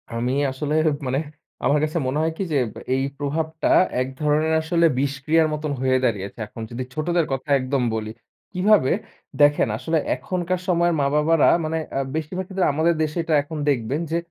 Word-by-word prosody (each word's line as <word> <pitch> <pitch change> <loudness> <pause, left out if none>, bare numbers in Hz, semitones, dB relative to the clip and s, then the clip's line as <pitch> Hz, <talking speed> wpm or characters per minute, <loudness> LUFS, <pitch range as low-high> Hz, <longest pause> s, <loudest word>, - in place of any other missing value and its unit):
আমি 115 +2 -1 0.2
আসলে 145 +3 -3 0.3
মানে 130 +2 0 0.5
আমার 145 - +3
কাছে 155 +2 -1
মনে 130 +3 -1
হয় 160 +1 +1
কী - - -1
যে - - +3 0.4
এই 135 - 0
প্রভাবটা 155 +3 -2 0.3
এক 130 - -1
ধরনের 150 +2 +2
আসলে 170 +1 +2
বিষক্রিয়ার 140 +4 +1
মতন 150 0 -3
হয়ে 130 0 +3
দাঁড়িয়েছে 100 -2 -2
এখন। 115 - -10
যদি 120 +2 -4
ছোটদের 170 +3 0
কথা 135 +2 -3
একদম 130 0 -1
বলি। 110 -1 -4 0.4
কীভাবে? 190 -6 +3 0.5
দেখেন 145 -1 +5
আসলে 160 +7 -1 0.2
এখনকার 180 0 -2
সময়ের 175 -1 +2
মা-বাবারা 150 +3 +3 0.2
মানে 160 +1 -1 0.2
আ - - +1 0.2
বেশিরভাগ 170 +4 -3
ক্ষেত্রে 190 -2 0
আমাদের 160 +3 +2
দেশে 155 +2 -3
এটা 165 - -1
এখন 155 +2 -7
দেখবেন 130 +1 0
যে 165 - +1
150 Hz, 170 wpm, -23 LUFS, 135-165 Hz, 0.5 s, দেখেন